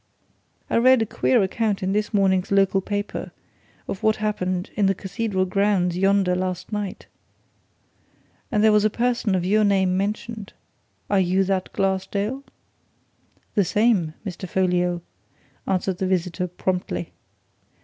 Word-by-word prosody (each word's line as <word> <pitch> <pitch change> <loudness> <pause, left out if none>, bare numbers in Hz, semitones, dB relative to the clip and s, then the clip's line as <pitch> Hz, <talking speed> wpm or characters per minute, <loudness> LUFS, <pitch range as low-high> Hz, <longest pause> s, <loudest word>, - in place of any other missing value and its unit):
I - - +1
read 255 0 +5
a - - -2
queer 130 - +2
account 205 +1 -1
in 190 - 0
this 210 0 0
morning's 195 -2 +2
local 195 -1 +3
paper 205 +1 -4 0.6
of 195 - -5
what 220 -1 +3
happened 185 -4 -2
in 205 -2 +2
the 195 - +2
Cathedral 195 0 -2
grounds 185 -2 +1
yonder 195 -1 +2
last 185 +1 -3
night, 205 -3 -4 1.5
and 210 -3 +2
there 220 - +6
was 210 -1 +4
a 215 - +4
person 235 -3 0
of 180 -1 -1
your 215 +3 +3
name 190 -3 +2
mentioned. 210 +2 -3 0.5
Are 200 - +2
you 185 +1 +2
that 190 -1 -1
Glassdale?" 200 +6 -1 1.1
"The 205 - +3
same, 190 -4 +1
Mr. 185 -1 -6
Folliot," 180 -1 +1 0.7
answered 190 -1 -1
the 190 - 0
visitor, 180 0 -1
promptly. 180 - -3
195 Hz, 140 wpm, -23 LUFS, 185-210 Hz, 1.5 s, there